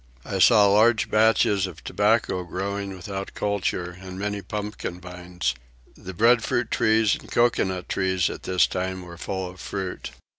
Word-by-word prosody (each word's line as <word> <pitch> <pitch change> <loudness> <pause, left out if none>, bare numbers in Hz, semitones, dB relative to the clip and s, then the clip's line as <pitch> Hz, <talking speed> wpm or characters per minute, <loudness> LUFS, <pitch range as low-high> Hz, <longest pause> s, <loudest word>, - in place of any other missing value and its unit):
I 95 - -3
saw 105 +1 +7
large 110 +3 +3
patches 110 -3 +3
of 85 -3 -11
tobacco 105 -3 +1
growing 100 +3 -4
without 95 +2 -6
culture 95 -3 -2
and 95 -1 -8
many 105 +1 -3
pumpkin 105 -4 -5
vines. 90 0 -4 0.4
The 95 -1 -9
breadfruit 120 +3 +2
trees 110 -1 +3
and - - -6
coconut 95 -6 +1
trees 95 -2 0
at - - -6
this 90 -1 +2
time 95 0 -3
were 85 -1 -11
full 95 -1 -3
of 90 +1 -11
fruit. 95 +1 -5
95 Hz, 150 wpm, -24 LUFS, 90-105 Hz, 0.4 s, saw